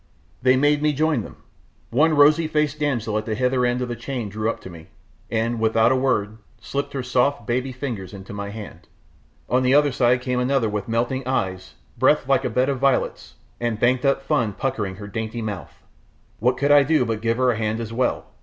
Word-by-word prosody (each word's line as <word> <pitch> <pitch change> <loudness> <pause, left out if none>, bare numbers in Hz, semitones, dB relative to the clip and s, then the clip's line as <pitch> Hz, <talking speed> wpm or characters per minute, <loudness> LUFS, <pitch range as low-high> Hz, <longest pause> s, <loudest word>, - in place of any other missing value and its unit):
They 130 0 +4
made 145 +2 +3
me 150 0 +2
join 155 -3 +1
them! - - -10 0.6
One 155 +6 +3
rosey 150 +3 +5
faced 150 -1 0
damsel 120 -7 0
at 110 - -8
the 110 - -1
hither 125 +2 +1
end 120 +1 0
of - - -3
the 120 - -4
chain 120 -2 -5
drew 110 +2 -2
up - - -3
to - - -9
me, 80 -2 -12 0.4
and, 115 +1 -1
without 110 +1 +3
a - - +3
word, 110 -5 0 0.2
slipped 140 +4 -4
her 135 -2 -3
soft, 130 +3 +1
baby 130 +2 -1
fingers 125 -8 -5
into 100 0 -10
my 100 0 -5
hand; 105 -1 -10 0.6
on 125 +1 +2
the 130 +1 +3
other 145 -1 +4
side 125 0 +2
another 125 +2 +1
came - - -7
with 105 -2 -3
melting 120 +3 -1
eyes, 95 -7 -2 0.2
breath - - +3
like - - +3
a - - -1
bed 130 +1 +1
of 140 -2 -1
violets, 135 0 0 0.2
and 115 -3 -2
banked 125 +2 +2
up 140 -1 +1
fun 115 -6 0
puckering 105 -6 -3
her 100 +1 -9
dainty 110 +2 -4
mouth. 105 -4 -7 0.6
What 125 +3 +1
could 140 +2 +1
I 145 0 +8
do 145 -2 +2
but 110 -2 -3
give 115 0 0
her 130 -1 +3
a 115 - -3
hand 110 0 -1
as 115 -1 -5
well? 125 +1 0
125 Hz, 215 wpm, -22 LUFS, 110-135 Hz, 0.6 s, I